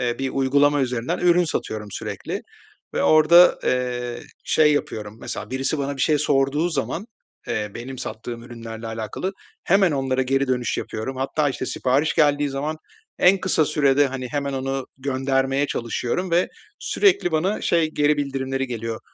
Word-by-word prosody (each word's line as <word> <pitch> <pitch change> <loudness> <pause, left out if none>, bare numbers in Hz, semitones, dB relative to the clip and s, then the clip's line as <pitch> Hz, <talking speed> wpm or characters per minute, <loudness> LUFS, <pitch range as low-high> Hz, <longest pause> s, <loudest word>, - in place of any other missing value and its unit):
eee, 120 -1 0
bir 135 -1 -2
uygulama 140 +2 +3
üzerinden 125 -2 -1
ürün 175 0 +4
satıyorum 110 -9 -4
sürekli - - -5 0.5
ve - - +1
orada, 160 +3 +6
eee, 125 -1 -1 0.2
şey 150 -1 +4
yapıyorum 110 -7 -3
mesela, - - -6
birisi 135 +3 -1
bana 140 0 -2
bir 135 - -1
şey 150 -2 +3
sorduğu 140 +5 +2
zaman, 175 +4 -3 0.4
eee, 105 -1 -2
benim 130 +3 -7
sattığım 115 +1 -6
ürünlerle 115 -1 -8
alakalı 115 - -4 0.3
hemen 195 -4 +4
onlara 130 -1 0
geri 135 +1 0
dönüş 125 -2 0
yapıyorum 110 +5 -4
hatta, 140 +3 0
işte, 130 -1 -4
sipariş 135 +6 +1
geldiği 145 -2 +3
zaman 145 +3 -3 0.4
en 190 +2 +5
kısa 180 -4 +2
sürede, 145 -1 +3
hani, 130 -1 -5
hemen 140 +2 -2
onu 135 0 -3
göndermeye 135 +1 0
çalışıyorum 125 +9 -2
ve 175 +2 +3 0.3
sürekli 390 - +2
bana 180 +7 0
şey 165 -2 +2
geri 150 -1 +2
bildirimleri 135 -2 -2
geliyor: 115 -2 -4
135 Hz, 155 wpm, -23 LUFS, 125-150 Hz, 0.5 s, orada